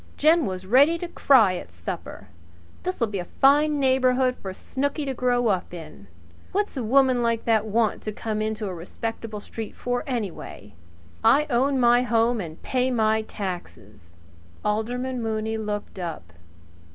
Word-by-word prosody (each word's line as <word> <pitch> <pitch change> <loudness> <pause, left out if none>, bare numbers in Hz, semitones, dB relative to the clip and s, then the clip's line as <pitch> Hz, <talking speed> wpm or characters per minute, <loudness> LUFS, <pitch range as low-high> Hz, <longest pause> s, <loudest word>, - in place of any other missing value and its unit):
"Jen 315 +1 +4
was 185 -1 -5
ready 280 - +5
to 350 - -5
cry 230 - +4
at 90 - -9
supper. 85 0 -7 0.5
This'll 365 -10 -1
be 205 -3 -4
a 175 - -4
fine 295 +2 +5
neighbourhood 260 -1 +3
for 195 - -7
Snooky 285 +9 -3
to 270 - -2
grow 245 -1 +1
up 185 -2 -1
in! 155 - -11 0.5
What's 410 -2 -1
a 260 - -2
woman 255 +1 +3
like 230 -1 0
that 220 -2 +2
want 220 0 +1
to 215 - -4
come 215 0 -3
into 215 0 -2
a 190 - -4
respectable 220 +5 -5
street 220 +1 -7
for 245 0 -2
anyway? 200 - -5 0.5
I 275 +7 +5
own 265 +3 +2
my 240 0 +5
home 235 -1 +2
and 160 -3 -8
pay 255 0 0
my 220 -3 +2
taxes 110 - -8 0.2
" 85 0 -24
Alderman 245 +4 -1
Mooney 220 0 -2
looked 210 -2 -4
up. 125 - -6
225 Hz, 160 wpm, -25 LUFS, 200-255 Hz, 0.5 s, ready